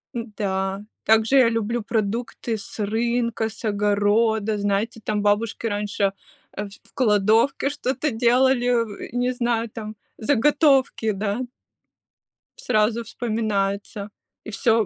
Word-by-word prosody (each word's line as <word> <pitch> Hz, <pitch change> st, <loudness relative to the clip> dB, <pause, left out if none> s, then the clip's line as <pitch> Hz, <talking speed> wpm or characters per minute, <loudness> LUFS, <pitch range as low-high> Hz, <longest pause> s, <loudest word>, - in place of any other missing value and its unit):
н-да, 195 Hz, -4 st, -3 dB, 0.2 s
также 220 Hz, +4 st, +4 dB
я 250 Hz, -3 st, +6 dB
люблю 230 Hz, +1 st, -1 dB
продукты 225 Hz, +1 st, -2 dB
с 200 Hz, -, -8 dB
рынка, 230 Hz, +1 st, 0 dB
с 220 Hz, -, -9 dB
огорода. 210 Hz, +1 st, +2 dB
Знаете, 205 Hz, +3 st, -1 dB
там 210 Hz, -1 st, -1 dB
бабушки 210 Hz, +3 st, 0 dB
раньше, 205 Hz, -2 st, 0 dB, 0.4 s
э, 210 Hz, -, -3 dB
в 200 Hz, -, -17 dB
кладовке 225 Hz, +4 st, +3 dB
что-то 290 Hz, +1 st, -2 dB
делали, 245 Hz, -2 st, +2 dB
э, -, -, -19 dB
не 245 Hz, +1 st, 0 dB
знаю, 235 Hz, -2 st, -1 dB
там, 215 Hz, 0 st, -7 dB, 0.2 s
заготовки, 275 Hz, -2 st, +3 dB
да. 205 Hz, +3 st, -2 dB, 1.2 s
Сразу 225 Hz, -, +1 dB
вспоминается. 210 Hz, -3 st, -2 dB, 0.3 s
И -, -, -8 dB
всё 225 Hz, +2 st, +3 dB
у -, -, -7 dB
220 Hz, 115 wpm, -23 LUFS, 205-235 Hz, 1.2 s, я